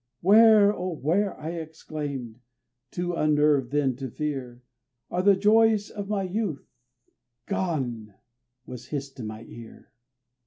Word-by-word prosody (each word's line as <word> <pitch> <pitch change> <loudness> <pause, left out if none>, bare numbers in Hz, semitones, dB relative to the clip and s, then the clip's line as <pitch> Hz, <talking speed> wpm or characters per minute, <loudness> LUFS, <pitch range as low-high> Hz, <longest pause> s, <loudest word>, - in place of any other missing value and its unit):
"Where, 210 +1 +6
oh! 180 -1 -4
where," 185 +8 0
I 160 +2 -5
exclaimed 150 -7 -6 0.5
(too 175 +3 -3
unnerved 150 -4 +2
then 140 -3 0
to 135 -1 -5
fear), 130 -3 -5 0.5
"Are 180 - 0
the 200 +1 +5
joys 215 +1 +3
of 200 -1 -6
my 205 -2 0
youth?" 185 -5 -3 0.8
"Gone," 120 - -3 0.5
was 125 -1 -9
hissed 140 -2 -6
in 110 - -5
my 110 +1 -8
ear. 115 -1 -13
155 Hz, 125 wpm, -26 LUFS, 130-195 Hz, 0.8 s, Where